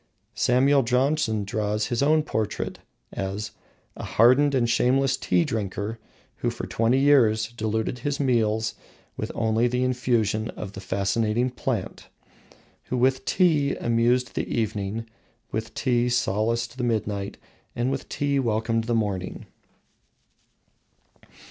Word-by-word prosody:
Samuel 135 +3 +3
Johnson 125 -3 +1
draws 105 -1 -1
his 120 -1 -1
own 155 +2 +4
portrait 110 -7 -3 0.3
as 100 +2 -4 0.4
"a - - -8
hardened 130 +5 +4
and 120 -2 +2
shameless 130 +3 +2
tea 90 -8 +1
drinker, 105 +1 -3 0.4
who - - -1
for - - -5
twenty 115 +3 +1
years 115 -6 +4
diluted 110 +1 -2
his 145 +3 -2
meals 110 -5 +1 0.4
with - - -4
only 115 +1 +2
the 125 +1 0
infusion 120 -4 0
of 100 -2 -6
the 95 - -8
fascinating 105 +6 0
plant; 120 -5 -4 0.8
who 130 - -2
with 130 +1 +2
tea 155 -7 +2
amused 120 +1 +1
the - - -2
evening, 110 0 -2 0.5
with 110 +2 -3
tea 125 -2 +1
solaced 115 +2 0
the - - -1
midnight, 105 -4 -2 0.4
and 120 +2 0
with 135 - -4
tea 140 -1 0
welcomed 115 -1 0
the 120 0 0
morning." 100 -5 -2
115 Hz, 125 wpm, -25 LUFS, 110-130 Hz, 0.8 s, own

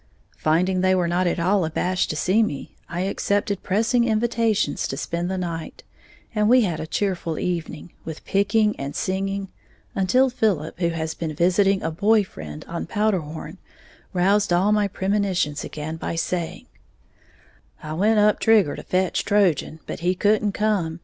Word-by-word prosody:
Finding 180 +4 +1
they 185 0 +3
were 180 -2 +1
not 175 +1 +1
at 175 - 0
all 185 +3 +2
abashed 180 +3 0
to - - -2
see 185 +8 +2
me, 150 -11 -3
I 175 +1 -3
accepted 200 +1 -1
pressing 230 +5 +2
invitations 220 -5 +1
to 135 - -5
spend 170 +4 -3
the 190 - -2
night, 170 -3 -5 0.5
and 210 -1 +2
we 250 +1 +6
had 175 -8 -1
a 160 - -5
cheerful 175 -4 -2
evening, 170 -2 -4
with 160 -1 -8
picking 205 +2 +2
and 140 +2 -5
singing, 195 +1 -2 0.4
until 250 +8 +3
Philip, 185 -10 -1
who 170 -2 +2
has 160 -1 -3
been 160 -2 -4
visiting 190 +4 +3
a 165 - -1
boy 210 +6 +3
friend 75 - -9
on 170 0 -5
Powderhorn, 185 -5 -2 0.5
roused 195 +2 +2
all 185 +4 +3
my 210 -1 +3
premonitions 190 -6 -1
again 155 +1 -5
by 165 - -4
saying, 165 0 -3 1.2
"I 155 - -5
went 210 +7 +2
up 210 0 +4
Trigger 215 -9 +4
to - - -7
fetch 185 0 0
Trojan; 185 -6 +1
but - - -6
he 180 +2 +1
couldn't 205 +1 +2
come. 190 -7 0
185 Hz, 165 wpm, -23 LUFS, 165-205 Hz, 1.2 s, we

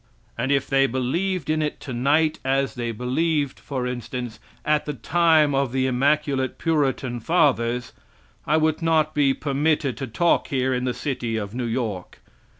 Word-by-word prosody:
And 135 - -1
if 140 -1 +2
they 135 -1 +3
believed 150 +8 -1
in 155 0 +1
it 150 -1 -2
tonight 145 +5 +1
as 135 0 0
they 120 -1 -3
believed, 140 +5 -1
for 130 -3 -4
instance, 125 -2 -5 0.3
at 150 0 +1
the 150 - -3
time 160 +2 +3
of 135 -2 +1
the 130 0 0
immaculate 135 +1 +1
Puritan 135 -6 0
fathers, 125 -5 +1 0.5
I 155 - +3
would 155 0 +1
not 160 -2 +2
be 140 -3 +2
permitted 145 -1 0
to 135 - -4
talk 170 +9 +1
here 130 -1 0
in 125 0 -1
the 125 - -1
city 120 -5 -3
of 100 -1 -5
New 120 -1 -2
York. 110 -6 -3
135 Hz, 160 wpm, -23 LUFS, 125-150 Hz, 0.5 s, they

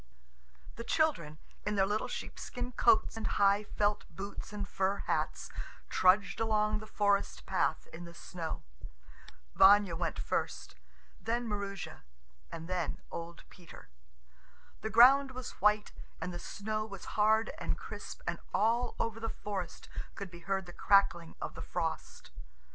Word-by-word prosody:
The 230 - -5
children, 235 - +1 0.3
in 210 0 -1
their 195 -1 +4
little 210 +2 -1
sheepskin 245 0 -5
coats 370 +5 +4
and 225 - -2
high 200 +1 +4
felt 205 0 0
boots 195 +6 -7
and 205 -1 -4
fur 195 0 0
hats, - - -1 0.4
trudged 195 +2 +4
along 215 -1 +2
the 215 - -10
forest 205 -2 +1
path - - 0
in 175 +2 -7
the 170 0 -11
snow. 170 -2 -5 0.9
Vanya 200 -2 +7
went 170 - -2
first, - - -2 0.5
then 235 +1 -1
Maroosia, 200 -2 -4 0.5
and 165 0 -6
then 180 -3 -2
old 170 0 -7
Peter. 170 - -14 0.9
The 220 - -2
ground 260 +5 +7
was 255 0 -8
white 210 +1 +3 0.3
and 175 +2 -4
the 175 - -5
snow 215 +4 -3
was 200 -3 -8
hard 220 +1 +3
and - - -1
crisp, - - -8
and - - -2 0.2
all 235 +3 +2
over 225 -1 -1
the 225 0 -2
forest 195 -5 -5 0.3
could 195 -3 -6
be 170 - -10
heard 190 +2 -1
the 175 - -10
crackling 175 -5 +3
of - - -4
the - - -8
frost. 165 -2 -4
205 Hz, 145 wpm, -32 LUFS, 180-220 Hz, 0.9 s, Vanya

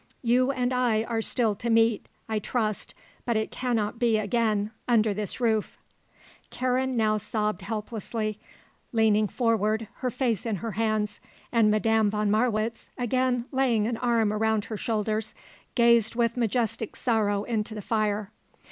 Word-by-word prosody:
You 250 +2 +3
and 255 -2 0
I 240 -3 +2
are 230 -1 -2
still 225 -1 +2
to 235 +4 -4
meet, 225 -1 +3 0.2
I 220 -1 -1
trust; 215 -1 -2 0.3
but 235 -2 0
it 220 - -2
cannot 230 -2 -2
again 220 -2 +2
be 220 +2 -10
under 220 -3 +3
this 210 +2 -4
roof." 220 -4 0 0.7
Karen 255 0 0
now 215 -1 +2
sobbed 210 -2 -2
helplessly, 215 0 -4 0.5
leaning 215 -2 +3
forward, 220 -1 0
her 255 - -1
face 245 -4 -1
in 220 - 0
her 225 +4 -4
hands, 215 0 -1 0.3
and 230 -3 +4
Madame 220 0 +3
von 210 0 0
Marwitz, 225 0 0
again 245 0 0
laying 255 -6 +2
an 230 0 -1
arm 230 -3 +1
around 220 0 +1
her 220 -2 -5
shoulders, 215 0 -2 0.4
gazed 235 -2 +4
with 235 -1 +1
majestic 230 -2 -1
sorrow 205 -4 +1
into 215 -1 -2
the - - -5
fire. 210 -2 -1
225 Hz, 145 wpm, -27 LUFS, 215-235 Hz, 0.7 s, and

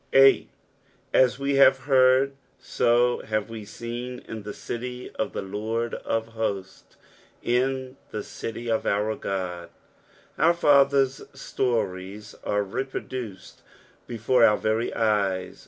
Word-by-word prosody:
S. 135 0 +8
^' - - -12 0.7
At 130 +1 +4
ma 140 - -4 0.2
have 135 - +5
h^trd, 130 0 +4 0.5
to 120 +1 +3
have 110 0 -1
tee 110 -2 -7
teen 120 +3 -6
in 110 - -6
the 105 - -8
aty 125 +4 -6
of 135 - -3
the - - -3
Lord 110 +4 -3
of 115 0 -2
htttU, 100 -4 -4 0.6
tn 130 +1 0 0.2
At 105 - -3
eity 115 +1 -6
of - - -2
onr 105 +2 -1
God." 90 -3 -4 0.7
Our 170 +1 +4
father's 140 -4 +4
stories 105 -7 -3
are 105 0 0
reproduced 120 -1 -6 0.5
before 120 +1 +2
our 105 -2 +6
very 110 +2 0
eyes. 100 -4 0
115 Hz, 125 wpm, -25 LUFS, 105-130 Hz, 0.7 s, S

